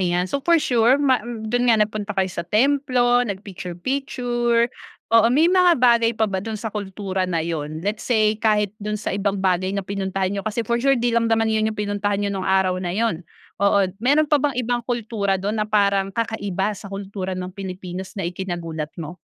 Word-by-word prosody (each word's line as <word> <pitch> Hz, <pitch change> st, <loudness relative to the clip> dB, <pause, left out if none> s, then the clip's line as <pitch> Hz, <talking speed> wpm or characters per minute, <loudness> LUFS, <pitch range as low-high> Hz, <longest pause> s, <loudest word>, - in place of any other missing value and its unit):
Ayan. 180 Hz, -1 st, +1 dB
So 280 Hz, +10 st, -2 dB
for 335 Hz, +4 st, +4 dB
sure 245 Hz, -4 st, +3 dB
ma 270 Hz, -4 st, +2 dB
do'n 240 Hz, +1 st, -2 dB
nga 230 Hz, -, +6 dB
nagpunta 210 Hz, -1 st, -5 dB
kayo 190 Hz, -1 st, +1 dB
sa -, -, -3 dB
templo, 245 Hz, +3 st, +2 dB
nag 205 Hz, -4 st, -3 dB
picture-picture, 240 Hz, +5 st, -1 dB, 0.5 s
oo, 230 Hz, 0 st, +6 dB
may 285 Hz, +6 st, +4 dB
mga 360 Hz, -1 st, +5 dB
bagay 235 Hz, -2 st, +3 dB
pa 220 Hz, -, +2 dB
ba 195 Hz, -3 st, -2 dB
do'n 220 Hz, +2 st, -4 dB
sa 220 Hz, 0 st, -5 dB
kultura 195 Hz, -2 st, -3 dB
na 165 Hz, -2 st, -1 dB
yun, 160 Hz, 0 st, -4 dB
let's 215 Hz, +2 st, -2 dB
say 215 Hz, -3 st, +3 dB
kahit 210 Hz, -3 st, +2 dB
do'n 210 Hz, +1 st, -2 dB
sa 210 Hz, -, -4 dB
ibang 200 Hz, 0 st, 0 dB
bagay 185 Hz, -1 st, +1 dB
na 195 Hz, -, -2 dB
pinuntahan 195 Hz, -1 st, -2 dB
niyo, 200 Hz, -, -2 dB
kasi 215 Hz, +3 st, -3 dB
for 235 Hz, +2 st, 0 dB
sure 275 Hz, +2 st, +3 dB
di 240 Hz, 0 st, 0 dB
lang 230 Hz, -1 st, +2 dB
naman 225 Hz, 0 st, +2 dB
yun 220 Hz, 0 st, +1 dB
yung 215 Hz, -, -5 dB
pinuntahan 205 Hz, -1 st, -1 dB
nyo 200 Hz, -, -1 dB
nung 190 Hz, -1 st, -3 dB
araw 190 Hz, -1 st, +2 dB
na 180 Hz, 0 st, -3 dB
yun. 225 Hz, -7 st, 0 dB, 0.4 s
Oo. 200 Hz, -1 st, +4 dB, 0.2 s
Mayro'n 285 Hz, +6 st, +4 dB
pa 295 Hz, -1 st, +2 dB
bang 275 Hz, -2 st, 0 dB
ibang 245 Hz, 0 st, 0 dB
kultura 220 Hz, -5 st, -1 dB
do'n 205 Hz, +3 st, -2 dB
na 210 Hz, -, -1 dB
parang 200 Hz, -2 st, +2 dB
kakaiba 205 Hz, -2 st, -2 dB
sa 200 Hz, 0 st, -9 dB
kultura 195 Hz, -1 st, -5 dB
ng 180 Hz, 0 st, -5 dB
Pilipinas 185 Hz, -1 st, -7 dB
na 195 Hz, -, -3 dB
ikinagulat 170 Hz, -3 st, -4 dB
mo? 165 Hz, 0 st, -7 dB
210 Hz, 200 wpm, -22 LUFS, 190-235 Hz, 0.5 s, nga